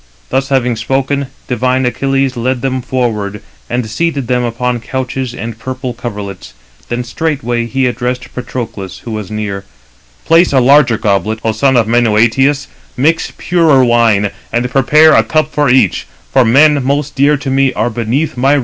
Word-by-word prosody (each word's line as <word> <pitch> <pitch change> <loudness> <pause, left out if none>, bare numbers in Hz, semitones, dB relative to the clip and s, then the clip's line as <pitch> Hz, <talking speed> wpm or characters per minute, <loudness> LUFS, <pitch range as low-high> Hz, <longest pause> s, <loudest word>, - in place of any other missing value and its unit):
Thus 135 +2 -1
having 125 -3 +1
spoken, 135 +4 -1 0.2
divine 125 +1 0
Achilles 135 +1 0
led 125 +1 -1
them 130 -1 -1
forward, 110 -6 -2 0.3
and 120 -2 -2
seated 140 +4 -2
them 125 +1 0
upon 120 +1 -2
couches 130 +1 -4
and 115 -1 -7
purple 130 +1 -5
coverlets; 105 - -7 0.3
then 120 +1 -2
straightway 120 -3 -2
he 130 +2 0
addressed 125 0 -3
Patroclus, 120 -6 -6
who 115 - -5
was 105 -4 -5
near: 105 -2 -4 0.6
"Place 165 +2 +4
a 135 - +5
larger 130 -2 +4
goblet, 105 +2 0
O 115 - +1
son 130 +4 +2
of 115 - +3
Menœtius, 120 +5 +2 0.3
mix 160 +6 +1
purer 160 -7 +3
wine, 115 -4 +3
299 100 - -2 0.3
and 125 - -4
prepare 150 +4 +5
a - - +5
cup 155 -1 0
for 145 -3 +1
each, 120 - +2 0.3
for 130 - +5
men 140 +4 +4
most 140 +2 -1
dear 145 +2 +3
[to 135 -1 -4
me] 135 0 +2
are 120 - -1
beneath 120 +7 -1
my 135 +3 +2
roof." 145 - +3
125 Hz, 165 wpm, -13 LUFS, 115-135 Hz, 0.6 s, a